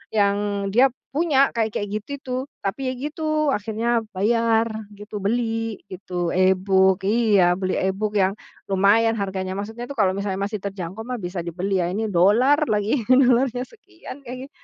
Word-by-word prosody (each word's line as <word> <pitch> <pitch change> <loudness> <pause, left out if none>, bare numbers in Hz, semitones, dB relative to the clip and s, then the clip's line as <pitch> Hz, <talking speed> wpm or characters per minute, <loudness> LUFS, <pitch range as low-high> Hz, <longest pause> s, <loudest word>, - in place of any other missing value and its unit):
yang 200 0 +1
dia 245 +6 +5 0.2
punya 285 -2 +3
kayak 220 -2 -1
kayak 205 - -2
gitu 215 - -25
itu, 255 -2 -4 0.3
tapi 255 +7 -2
ya 255 - -1
gitu, 305 +2 -1
akhirnya 225 +1 0 0.2
bayar 225 +2 +2 0.2
gitu, 210 +1 -7
beli 225 +1 -2
gitu, 180 -2 -3
e-book 190 0 +3
iya, 205 -4 +3
beli 185 -1 -1
e-book 200 +3 -1
yang 190 -2 +3 0.4
lumayan 200 +4 +4
harganya 190 -1 -3
maksudnya 220 +4 -6
tuh, 280 - -7
kalau 190 -2 +3
misalnya 200 -1 -3
masih 205 0 -3
terjangkau 195 +1 -5
mah 250 +1 -5
bisa 175 -2 -4
dibeli 180 +2 -1
ya, 175 - -2
ini 220 +4 -2
dollar 220 - +4
lagi, 215 +4 +1
dollarnya 255 -1 +4
sekian 355 - -13
kengi 255 +2 -8
210 Hz, 155 wpm, -23 LUFS, 190-240 Hz, 0.4 s, dia